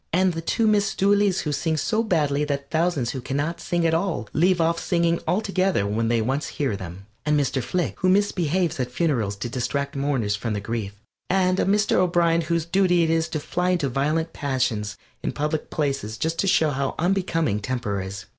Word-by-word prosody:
And 185 +1 +3
the 165 - -4
two 225 +7 0
Miss 205 -2 +2
Dooleys 200 -1 +3
who 150 - -2
sing 160 +2 0
so 215 +9 +1
badly 150 -9 +1
that 140 -1 -4
thousands 160 -7 +1
who 130 - -5
can 130 +2 -3
not 165 +4 -2
sing 175 -1 0
at 165 - +2
all 165 - -1
leave 180 +2 +3
off 165 0 +2
singing 170 -1 +1
altogether 190 - +1
when 110 +3 0
they 115 -1 +2
once 135 +6 -1
hear 135 -8 -2
them. 95 0 -8 0.2
And 150 0 +2
Mr. 135 -1 0
Flick, 175 +8 -2
who 185 - +2
misbehaves 185 -4 +1
at 125 -1 -1
funerals 125 - 0
to 100 - -4
distract 140 +3 -2
mourners 135 -7 0
from 110 +2 -3
their 105 - -2
grief, 105 -2 -4 0.3
and 185 0 +2
a - - +2
Mr. 205 +2 +2
O'Brien, 170 -2 +3
whose 170 0 -1
duty 180 -1 +3
it 160 - +1
is 165 -1 +1
to 155 - -2
fly 180 +4 -1
into 170 -7 +1
violent 155 +5 0
passions 125 -7 -1 0.2
in - - -2
public 150 +1 -2
places 135 -8 -2
just 165 +4 -2
to 195 - +1
show 160 -4 +3
how 135 0 -2
unbecoming 165 - 0
temper 105 -4 -2
is. 95 +1 -7
155 Hz, 200 wpm, -24 LUFS, 130-175 Hz, 0.3 s, And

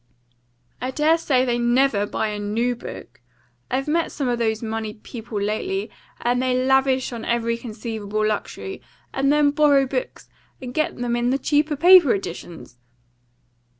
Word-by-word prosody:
"I 255 - -2
dare 310 +5 +2
say 260 -5 +2
they 240 -1 0
NEVER 240 -3 +2
buy 215 - -2
a 210 0 -4
NEW 225 +4 -1
book. 240 - -10 0.5
I've 265 +2 -1
met 330 +2 0
some 275 - -3
of 240 -1 0
these 220 -1 0
moneyed 220 -1 -5
people 225 -3 -6
lately, 220 - -2 0.3
and 245 +1 +1
they 255 0 +1
lavish 265 -1 +2
on 230 -1 -6
every 235 0 0
conceivable 215 -2 -4
luxury, 215 - -3 0.3
and 275 +1 +2
then 295 -1 +4
borrow 285 -2 +4
books, - - -4 0.3
and 250 -2 -7
get 310 +2 -1
them 240 -1 -1
in 240 0 0
the 265 - +2
cheap 295 +2 +1
paper 350 - +7
editions." 170 -8 -8
245 Hz, 155 wpm, -22 LUFS, 220-275 Hz, 0.5 s, paper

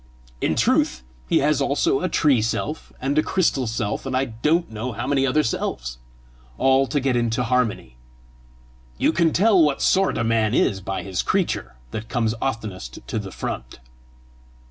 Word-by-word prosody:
In - - +1
truth 65 0 +2 0.3
he - - +4
has 150 -1 +2
also 140 -1 +1
a 185 - 0
tree 145 -7 +3
self 130 +7 -3
and 140 +3 +1
a - - +5
crystal 155 -8 +1
self, 110 -2 -2
and 130 -1 0
I 135 - +1
don't 150 +8 0
know 115 +3 -4
how 120 +4 -4
many 135 -1 +2
selves - - -3 0.6
more 130 - +1
all 135 0 +4
to 145 - 0
get 135 -2 0
into 120 0 0
harmony. 115 - -1 1.0
You 160 - +2
can 170 -2 +3
tell 200 +1 +4
what 150 -3 +2
sort 195 0 +2
a - - 0
man 115 0 +1
is 95 -2 +2
by 95 -1 -4
his 95 -2 -2
creature - - -1 0.2
that 110 +1 -6
comes 115 -3 0
oftenest 105 - -4
to - - -3
the 100 -2 -6
front." 60 -7 -5
125 Hz, 170 wpm, -23 LUFS, 110-145 Hz, 1.0 s, a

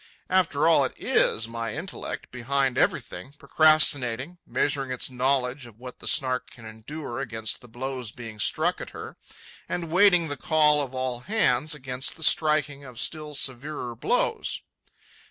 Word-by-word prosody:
After 165 -5 +2
all, 165 - +5
it - - -3
is 115 - +2
my 115 0 -4
intellect, 180 +5 -6
behind 130 +1 0
everything, 90 +11 -1
procrastinating, 150 -1 +2
measuring 135 -2 0
its 125 +1 +1
knowledge 130 0 0
of 110 -3 -16
what 125 +1 -10
the - - -7
Snark 130 -3 +1
can 115 - -15
endure 120 +4 -7
against 110 -5 -2
the 125 - -14
blows 125 0 -5
being 115 -3 -10
struck - - +2
at - - -7
her, - - -8 0.5
and 170 -2 -4
waiting 180 -2 +5
the 145 -1 -2
call 150 -1 +3
of 135 -2 -5
all 130 -1 -2
hands 155 - +1
against 130 -1 -2
the 160 - -3
striking 150 -3 +3
of 125 -4 -9
still 150 -2 -2
severer 130 -1 -2
blows. 115 - -1
135 Hz, 155 wpm, -26 LUFS, 125-150 Hz, 0.5 s, all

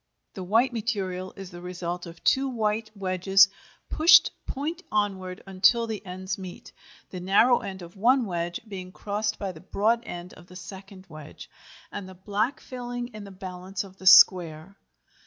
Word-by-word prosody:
The 190 - -7
white 230 +7 +2
material 185 -4 -3
is 195 -2 -9
the 175 0 -10
result 180 -1 -5
of 165 0 -13
two 270 0 +3
white 220 -2 -1
wedges 190 0 +4 0.4
pushed 320 +3 +6 0.2
point 315 +6 -4
onward 190 -3 -2
until 195 +5 +3
the 220 -2 -5
ends 185 0 -5
meet, 185 -2 -9 0.4
the 185 - -6
narrow 200 +7 +4
end 190 -2 -7
of 175 +2 -12
one 245 +5 +3
wedge 175 -2 -3
being 185 -3 -8
crossed 210 +2 -3
by 195 -2 -4
the 160 -3 -13
broad 220 +5 +1
end 175 +1 -7
of 175 - -16
the 180 - -14
second 190 +1 -11
wedge, 155 -1 -12 0.4
and 200 -2 -7
the 185 - -12
black 205 +8 -2
filling 245 -1 -6
in 215 -4 -10
the - - -10
balance 185 0 -6
of 190 -1 -14
the 190 - -6
square. 175 -1 +6
195 Hz, 170 wpm, -26 LUFS, 180-215 Hz, 0.4 s, pushed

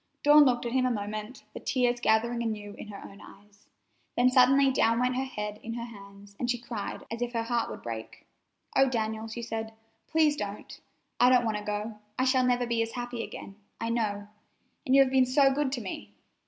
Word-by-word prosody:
Dawn 295 0 +8
looked 245 -2 +1
at 235 - -2
him 255 0 +2
a - - +1
moment, 215 +1 -5
the - - -6
tears 245 -2 0
gathering 235 +1 +2
anew 210 -3 -4
in - - -10
her 200 -1 -9
own 200 - -13
eyes; 205 0 -17 0.5
then 250 +1 +4
suddenly 270 +2 +5
down 230 -2 +2
went 250 0 +1
her 260 +1 -1
head 210 -4 -5
in 230 0 -6
her 235 -1 -4
hands, 200 -2 -13
and 245 - -2
she 245 - +1
cried 230 -3 -6
as 230 +1 -5
if 245 0 -2
her 230 -1 0
heart 235 0 -1
would - - -8
break. 115 -1 -7 0.5
"Oh, 270 0 +5
Daniel," 220 -2 -2
she 235 +1 -6
said, 225 -1 -4 0.3
"please 315 -2 +3
don't! 205 -4 -6 0.4
I 245 - +6
don't 250 -1 +4
want 220 -2 0
to 210 - -6
go. 210 +1 -4 0.2
I 255 - +2
shall 260 -1 +3
never 245 0 +2
be 235 -1 0
as 225 0 -2
happy 245 -1 -4
again, 195 - -9 0.2
I 230 - -2
know, 205 -3 -1 0.6
and 260 - +4
you 275 - +8
have 260 - -3
been 260 -1 +4
so 270 +1 +4
good 285 -1 0
to 250 - -2
me! 105 - -7
235 Hz, 220 wpm, -28 LUFS, 210-255 Hz, 0.6 s, Dawn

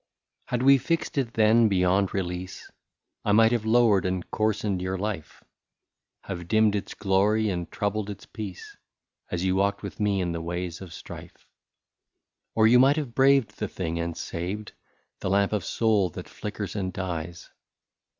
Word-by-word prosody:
Had 125 0 -1
we 135 0 +7
fixed 165 +5 -1
it 120 -4 -3
then 110 +1 +5
beyond 95 0 +2
release, 90 -1 -5 0.5
I 105 - +2
might 115 +1 +6
have 115 -3 0
lowered 110 -5 +4
and 90 -1 -2
coarsened 105 -3 0
your 95 +1 -2
life, 95 -6 -5 0.8
Have 85 -3 -6
dimmed 110 +1 +3
its 100 - -4
glory 105 +2 +2
and 85 -2 -4
troubled 105 0 -2
its 100 - -8
peace, 100 -5 -8 0.5
As 90 0 -2
you 95 0 +2
walked 100 +1 0
with 100 - -7
me 105 -2 +1
in 90 -2 -1
the 85 -1 -3
ways 85 +1 -4
of 95 -3 -9
strife; - - -11 1.1
Or 110 - +4
you 120 +2 +7
might 135 +3 +5
have 140 -6 -3
braved 135 -5 +3
the 105 - -1
thing, 85 -3 -4
and 85 -1 -3
saved 95 +5 -5 0.5
The - - -2
lamp 100 +1 +2
of 105 -4 0
soul 105 -5 +1
that - - -8
flickers 105 -1 -6
and 95 -3 -2
dies. 85 -2 -5
100 Hz, 165 wpm, -26 LUFS, 90-110 Hz, 1.1 s, we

